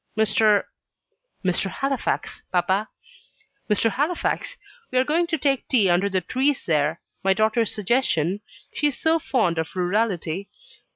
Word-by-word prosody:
"Mr. 215 -1 +4 0.8
Halifax, 215 +9 -1
papa." 190 +4 +1 0.8
"Mr. 215 +2 +2
Halifax, 335 - -1 0.3
we 255 - -1
are 255 - +5
going 330 +5 +1
to 330 -2 -1
take 275 -2 0
tea 210 -8 +3
under 185 +3 +2
the 185 -1 0
trees 265 +9 0
there 155 0 +1 0.2
my 195 0 +3
daughter's 220 +2 +2
suggestion 205 - 0 0.3
she 295 - +2
is 285 - -2
so 320 +1 +2
fond 215 - 0
of 160 +3 -4
rurality. 185 -1 -1
215 Hz, 130 wpm, -23 LUFS, 185-265 Hz, 0.8 s, are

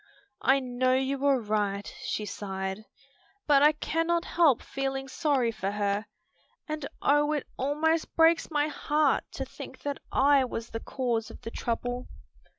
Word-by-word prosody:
"I 270 +1 +4
know 255 0 +1
you 270 +1 -1
are 275 -2 +4
right," 205 -2 -1
she 210 - -3
sighed, 190 +1 -4 0.6
"but 285 -2 +5
I 300 +1 +6
cannot 330 +3 0
help 315 -8 +3
feeling 270 0 -3
sorry 270 -5 +1
for 195 -3 -3
her, 205 +1 -1 0.6
and 305 -2 -4 0.2
oh 295 +1 +3
it 295 - -2
almost 310 +4 0
breaks 330 0 +4
my 295 -2 +1
heart 300 -1 +1
to - - -4
think - - -10
that 285 -1 -3
I 275 0 +5
was 235 -2 -5
the 225 - -3
cause 235 -3 -2
of - - -12
the 230 - -6
trouble." 245 +2 -3
270 Hz, 155 wpm, -28 LUFS, 225-295 Hz, 0.6 s, I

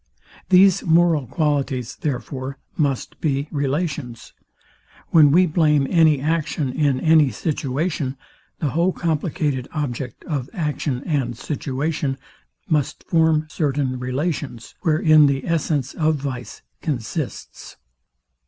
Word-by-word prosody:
These 190 0 +6
moral 165 -4 +3
qualities, 140 -5 -1
therefore, 130 -1 -4 0.2
must 140 -5 -2
be 140 -2 0
relations. 140 -3 -3 0.8
When 155 -3 +6
we 180 +5 +5
blame 150 -4 +2
any 160 -5 +5
action, 150 -2 -1
in 140 -3 +1
any 155 -2 +5
situation, 140 - -2 0.4
the 150 - -1
whole 170 +5 +1
complicated 155 -5 -1
object, 130 -5 -4
of 140 -5 -3
action 150 - -2
and 130 -7 -1
situation, 140 +1 -2 0.5
must 150 -3 -1
form 160 -2 +2
certain 135 -4 -1
relations, 130 -1 -3
wherein 155 -2 +5
the 135 -1 -1
essence 150 -5 -1
of 155 -1 +1
vice 135 -4 -6 0.2
consists. 135 +1 -5
145 Hz, 105 wpm, -22 LUFS, 135-160 Hz, 0.8 s, These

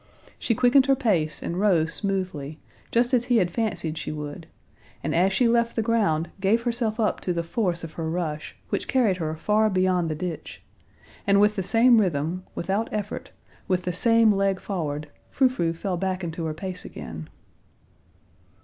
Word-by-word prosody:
She 230 - 0
quickened 255 +3 +4
her 270 - +5
pace 185 - +1
and 175 - -3
rose 170 -6 +2
smoothly, 185 -7 -2 0.3
just 240 +2 +1
as 245 -1 +3
he 245 -1 +3
had 180 -5 +2
fancied 170 -7 -2
she 155 - -4
would, 150 +1 -7 0.6
and - - -1
as 185 +3 +3
she 235 +5 +3
left 235 0 +2
the 225 - +1
ground 205 -8 +1
gave 210 +5 +2
herself 235 -2 0
up 215 - 0
to 180 - -2
the 170 0 -1
force 175 -2 -1
of 165 - -6
her 160 -1 -3
rush, 160 -3 -3
which - - -2
carried 235 -8 +2
her 160 -2 -3
far 215 +6 +2
beyond 185 -3 +1
the 155 - -2
ditch; 170 +1 -6 0.6
and 200 0 +5
with 210 +1 +4
the 195 - -1
same 230 +4 +5
rhythm, 170 0 -1
without 200 +6 -1
effort, 210 0 -4 0.4
with 185 -1 0
the 180 - -2
same 230 +4 +4
leg 195 -1 +1
forward, 150 -6 -3 0.2
Frou 265 - +3
Frou 175 -10 -1
fell 180 +2 -3
back 190 0 -2
into 165 0 -4
her 155 - -2
pace 180 +2 -5
again. 80 -1 -8
190 Hz, 180 wpm, -25 LUFS, 165-225 Hz, 0.6 s, her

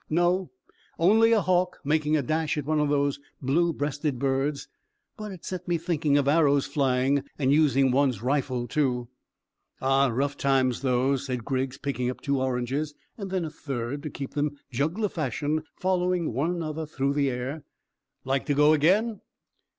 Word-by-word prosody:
"No; 175 +2 +1 0.5
only 220 +7 +5
a 225 -2 +4
hawk 180 -1 +1
making 155 +1 +2
a 145 - 0
dash 155 +3 -1
at 150 - -2
one 155 +1 +1
of 150 -1 +1
those 140 -1 +1 0.2
blue 165 +6 +2
breasted 145 -2 -2
birds; 135 +2 -1 0.5
but 215 -3 -7
it 185 -3 -10
set 185 -1 -5
me 175 -1 +1
thinking 155 -4 +1
of 140 -1 +1
arrows 145 -2 +4
flying, 135 -1 +1
and 135 -1 +2
using 140 -3 +4
one's 130 -4 +2
rifle 130 -2 0
too." 125 -3 0 0.7
"Ah, 135 +1 +3
rough 135 +4 -1
times 130 -3 +1
those," 135 +1 +1
said 125 -3 -3
Griggs, 130 -1 -2
picking 125 -3 -2
up 125 - -5
two 140 -2 -1
oranges, 130 +4 -2 0.2
and 200 -3 -6
then 185 -2 -1
a 155 - -6
third, 135 -1 -4
to 150 - -5
keep 135 -1 -7
them, 145 0 -1
juggler 160 - 0
fashion, 150 - -2
following 180 -4 0
one 140 +8 0
another 160 -3 -3
through 140 -2 -1
the 140 -1 +1
air. 130 +4 -4 0.6
"Like 135 +1 -1
to 145 - +1
go 150 +2 +5
again?" 195 +8 +2
145 Hz, 170 wpm, -26 LUFS, 135-160 Hz, 0.7 s, only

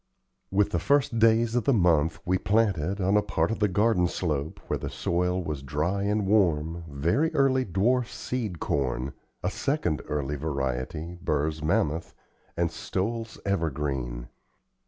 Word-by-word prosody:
With 100 +1 +2
the 85 - +1
first 140 - +2
days 115 0 +4
of 120 -1 +1
the 140 - +4
month 85 -6 +3
we 90 0 +1
planted, 100 -4 +1
on 95 +2 +2
a 105 - +5
part 105 +1 0
of 115 - -2
the 105 - +3
garden 100 -2 +2
slope, 80 -4 -2
where - - -2
the - - -4
soil 90 +1 0
was 75 -4 -4
dry 75 +8 -1
and 105 +1 +1
warm, 85 -5 +2
very 85 - +1
early, 130 -2 +3
dwarf 115 +7 +1
sweet 115 -7 -4
corn, 65 -1 -1 0.3
a - - 0
second 90 - -1
early 75 -1 -2
variety, 70 +4 -3
Burr's 75 0 -1
Mammoth, 80 +1 0 0.4
and 85 -1 +1
Stowell's 115 +4 -3
Evergreen. 70 -10 -2
90 Hz, 150 wpm, -27 LUFS, 75-110 Hz, 0.4 s, a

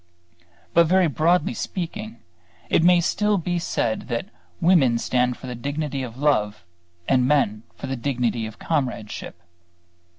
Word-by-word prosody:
But 170 -1 +5
very 185 +2 +4
broadly 160 0 +2
speaking 210 - -5 0.5
it - - +4
may 175 0 +6
still 210 +4 +1
be 175 0 -1
said 115 -9 -2
that 120 -2 -3 0.3
women 150 -10 +4
stand 125 +1 0
for - - -11
the 125 - -5
dignity 140 +3 -3
of 125 -2 -7
love 105 - +1 0.4
and 130 -2 +3
men 130 -7 +2
for - - -7
the 135 - -3
dignity 120 -3 -1
of 110 - -11
comradeship. 125 - -3
140 Hz, 140 wpm, -23 LUFS, 120-170 Hz, 0.5 s, may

